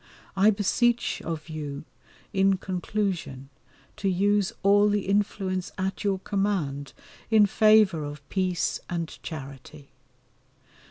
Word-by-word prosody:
I 195 +2 +5
beseech 230 +3 +1
of 160 -1 -5
you 150 -3 -6 0.5
in 195 0 +3
conclusion 180 -7 -3 0.5
to 195 - 0
use 200 +1 +2
all 205 +1 +5
the 205 0 +1
influence 195 -2 -1
at 190 +2 -3
your 200 -2 +1
command 185 -9 -2 0.4
in 220 -2 +6
favour 215 -5 +4
of 145 -1 -8
peace 180 -5 -1
and 170 -2 -3
charity. 140 -1 -9
190 Hz, 110 wpm, -26 LUFS, 155-205 Hz, 0.5 s, in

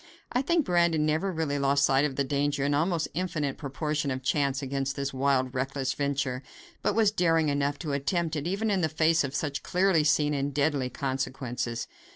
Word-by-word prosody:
I 250 - +1
think 330 +1 +1
Brandon 170 -3 +2
never 160 +5 0
really 155 -4 -1
lost 140 +1 +3
sight 135 +1 +3
of 140 -3 -2
the 140 - +1
danger, 140 0 0
and 145 +1 +1
almost 165 +2 +1
infinite 155 -5 -2
proportion 150 0 -2
of 130 0 -3
chance 140 0 0
against 135 0 -2
this 140 -1 -3
wild, 130 -1 +1
reckless 135 +1 -1
venture, 140 -3 -1 0.4
but - - 0
was 220 -2 +4
daring 165 -5 +2
enough 140 0 0
to 150 -3 -4
attempt 160 +3 -1
it 150 +1 -2
even 205 +4 0
in 195 -2 +1
the 160 - +1
face 160 +1 +3
of 140 0 -4
such 145 -1 -2
clearly 180 -3 +2
seen 150 0 +2
and 140 -1 -2
deadly 145 -3 +1
consequences. 130 -3 -3
145 Hz, 190 wpm, -28 LUFS, 135-160 Hz, 0.4 s, was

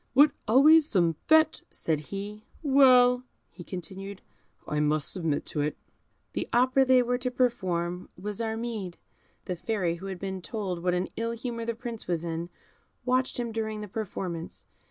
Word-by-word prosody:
"What, 290 +2 +7 0.2
always 295 +7 +7
some 170 -5 +2
fête?" 315 +1 +5
said 160 -2 -1
he. 205 +2 -6 0.2
"Well," 255 -3 +6 0.3
he 175 - -10
continued, 190 +3 -7 0.4
"I 150 - -1
must 150 -1 +2
submit 165 -6 -1
to 150 - -2
it." 150 +1 -1 0.6
The - - -3
opera 255 +2 +4
they 255 -1 +5
were 245 +1 0
to 250 0 -1
perform 185 -8 -1
was 205 +4 -4
Armide. 220 -5 -3 0.5
The 180 - -2
Fairy, 175 -3 -1
who 190 +3 -8
had 190 -1 -4
been 190 0 -5
told 185 -3 -4
what 180 0 +1
an 180 +1 -1
ill 230 0 -1
humour 230 0 -4
the 230 0 -2
Prince 230 -1 -7
was 170 -1 -1
in, 165 +1 -3 0.6
watched 255 0 +1
him 235 -1 -2
during 220 -1 -3
the 210 - -6
performance. 185 -5 -5
210 Hz, 165 wpm, -28 LUFS, 180-245 Hz, 0.6 s, What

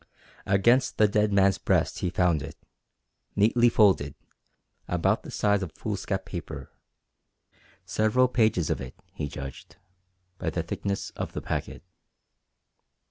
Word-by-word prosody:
Against 120 +7 +3
the 105 - +5
dead 105 0 +1
man's 100 -1 +3
breast - - +1
he 90 - -1
found 85 -4 +2
it, 70 - -7 0.8
neatly 120 +4 +4
folded, 95 -11 +3 0.7
about 90 -2 +1
the - - -10
size 105 -1 +1
of 90 -5 -5
foolscap 100 -2 -3
paper 80 -7 -7 1.1
several 110 +6 +2
pages 110 -9 +1
of - - -1
it, 65 -1 -8 0.2
he 75 - -4
judged, 70 -2 -8 0.6
by 90 - -1
the 85 +1 -2
thickness 100 +4 -3
of - - -6
the - - -4
packet. - - -4
95 Hz, 130 wpm, -27 LUFS, 85-105 Hz, 1.1 s, the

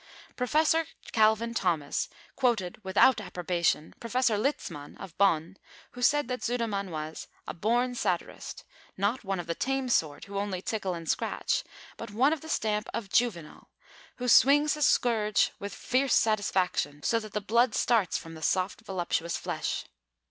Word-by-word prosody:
Professor 310 +5 +2 0.2
Calvin 220 +1 +3
Thomas 170 -9 0 0.3
quoted 220 -7 0
(without 205 +5 +4
approbation) 175 -4 -1
Professor 235 -1 +1
Litzmann 205 - -3
of 190 -4 -10
Bonn, 180 -2 +2 0.3
who 245 - -10
said 290 +2 +3
that 250 0 -3
Sudermann 225 -5 -1
was 155 -1 -6 0.2
"a - - -4
born 240 +7 +1
satirist, 245 - -3 0.3
not 205 +7 0
one 195 -2 -2
of 175 - -4
the 170 - -2
tame 270 +6 -1
sort 155 -10 0
who 200 0 -4
only 200 -2 -2
tickle 195 -2 -2
and 165 -1 -8
scratch, - - 0 0.3
but 230 - -7
one 255 +9 +3
of 320 - -4
the 320 - -10
stamp 210 -5 -1
of 200 -4 -5
Juvenal, 180 -11 -1 0.5
who 250 - -4
swings 290 +4 +6
his 300 -2 +2
scourge 215 -4 +2
with 200 0 -5
fierce 265 +1 +1
satisfaction 190 -8 +1
so 230 - +2
that 215 -2 -10
the 210 - 0
blood 235 +5 +2
starts 220 -7 +2
from 165 - -9
the 160 - -10
soft, 185 +6 0
voluptuous 175 -4 -2
flesh." - - -3
210 Hz, 155 wpm, -29 LUFS, 180-245 Hz, 0.5 s, swings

